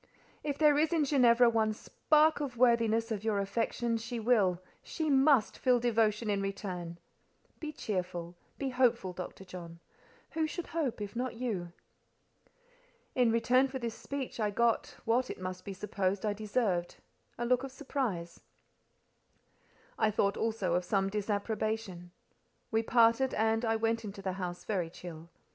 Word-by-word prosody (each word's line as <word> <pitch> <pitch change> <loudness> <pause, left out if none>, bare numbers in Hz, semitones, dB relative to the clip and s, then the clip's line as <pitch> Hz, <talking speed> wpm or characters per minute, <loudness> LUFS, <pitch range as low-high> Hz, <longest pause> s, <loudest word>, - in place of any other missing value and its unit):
"If 285 -2 -2
there 295 -1 +5
is 315 +2 +2
in 320 -3 +2
Ginevra 245 -4 +5
one 220 -2 +2
spark 310 +7 +2
of 270 -5 -4
worthiness 230 -2 +3
of 210 -2 -2
your 220 -2 +1
affection, 230 +3 -1
she 230 +1 -5
will—she 215 - 0
must 270 -3 +4
feel 250 -2 +3
devotion 225 -2 +1
in 200 -1 +1
return. 185 -4 -4 0.6
Be 310 -1 -4
cheerful, 180 - -4 0.2
be 275 - -2
hopeful, 240 -7 +2
Dr. 185 +1 -8
John. 170 -2 -9 0.5
Who 320 0 0
should 345 +2 -5
hope, 285 -10 -2
if 205 +2 -5
not 250 0 -2
you?" 210 -8 -3 1.4
In 245 -3 +3
return 250 +3 +3
for 265 0 -5
this 235 -3 -3
speech 275 -2 -6
I 210 -1 +1
got—what, 235 +2 0
it - - -6
must 185 0 -5
be 200 - -5
supposed, 195 0 -1
I 210 - +1
deserved—a 210 +1 -3
look 250 +1 +3
of 270 - -5
surprise: 245 - -3 1.6
I 215 - +4
thought 200 -1 +1
also 220 -6 -1
of 180 +1 +1
some 195 +1 0
disapprobation. 210 -2 -2 0.6
We 220 0 +2
parted, 230 +3 +3
and 225 +1 +1
I 225 -1 +2
went 225 +1 0
into 200 -1 -7
the 190 -1 -1
house 180 -2 -5
very 185 -6 -1
chill. 165 -1 -10
225 Hz, 150 wpm, -31 LUFS, 195-250 Hz, 1.6 s, there